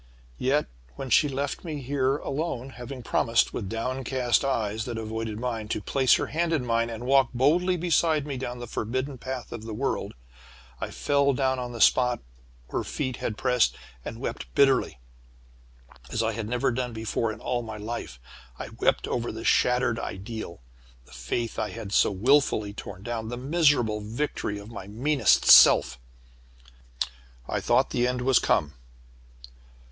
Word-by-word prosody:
"Yet, 140 +4 +2 0.3
when 135 -2 -6
she 150 - +5
left 140 +1 -3
me 155 -4 -4
here 135 0 0
alone, 135 -4 -4
having 125 0 -8
promised, 115 0 +2
with 100 -5 -4
downcast 125 +2 0
eyes 110 -5 -1
that 120 -2 -4
avoided 110 -1 -4
mine, 115 -3 -3
to 110 - -2
place 130 +4 +3
her - - -1
hand 170 +2 -1
in 140 -6 0
mine, 115 0 +1
and 115 +1 -6
walk 135 -1 +4
boldly 175 +8 +3
beside 165 -3 +2
me 145 -2 -4
down 125 -1 -5
the 120 - -6
forbidden 130 +4 -3
path 130 0 -6
of 120 - -6
the 110 -1 -6
world, 135 +5 -2 0.6
I - - -4
fell 140 -1 +1
down 130 0 0
on 125 -1 -4
the 120 - -7
spot 125 +1 +4 0.5
her - - -1
feet 130 -4 -3
had 110 - -3
pressed, 125 -2 +2 0.3
and 115 - -7
wept 135 - -4
bitterly, 135 - +3 1.1
as 115 - 0
I 115 - +1
had 110 -1 -4
never 125 +1 +1
done 125 0 -3
before 110 0 -2
in - - -9
all 125 -1 -2
my 110 -2 -7
life. 105 - -6 0.6
Wept - - +2
over 120 -1 -2
the 110 +1 -7
shattered 125 -2 +2
ideal, 100 - -6 0.4
the - - -20
faith 70 - -3
I 105 - -1
had 105 0 -7
so - - +4
wilfully 110 -1 +2
torn 100 -1 -9
down, 115 -1 -4
the 120 - -4
miserable 135 -6 +2
victory 110 -1 -3
of 100 +2 -10
my 100 -4 -8
meanest 125 +2 +2
self. 65 0 +7 1.5
"I - - -1
thought - - +2
the 120 0 +1
end 125 0 -1
was 130 0 +4
come. 75 0 +1
120 Hz, 165 wpm, -26 LUFS, 110-135 Hz, 1.5 s, self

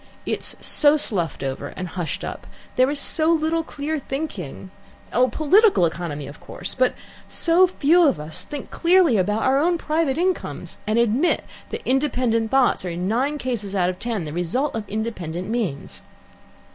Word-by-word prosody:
It - - -1
is - - -3
so 295 0 +5
sluffed 175 - -1
over 135 +1 -4
and 185 +4 -7
hushed 160 -5 -4
up, - - -7 0.3
there 255 +1 +4
is 290 0 0
so 315 +2 +3
little 325 0 +1
clear 310 0 -4
thinking 260 - -6 0.4
oh, 250 +1 +4
political 325 - +4
economy, 160 -3 -4
of 145 +2 -11
course, 180 - -2
but 255 0 +1 0.3
so 350 +2 +5
few 345 0 +4
of 185 - +1
us 155 +1 -2
think 290 -3 -8
clearly 340 - +4
about 210 +4 0
our 265 +1 +3
own 340 +3 +2
private 310 -3 0
incomes, 365 +2 -2
and 215 +1 +1
admit 235 +8 +2 0.2
that - - -6
independent 250 -4 +1
thoughts 265 -5 +2
are 180 - -3
in 175 +2 -3
nine 265 +8 0
cases 225 -7 -3
out 180 -1 +2
of 180 - -12
ten 225 -8 -2
the 150 - -6
result 180 - 0
of 215 -3 -5
independent 185 -5 -4
means. 210 -11 -3
240 Hz, 170 wpm, -22 LUFS, 180-300 Hz, 0.4 s, so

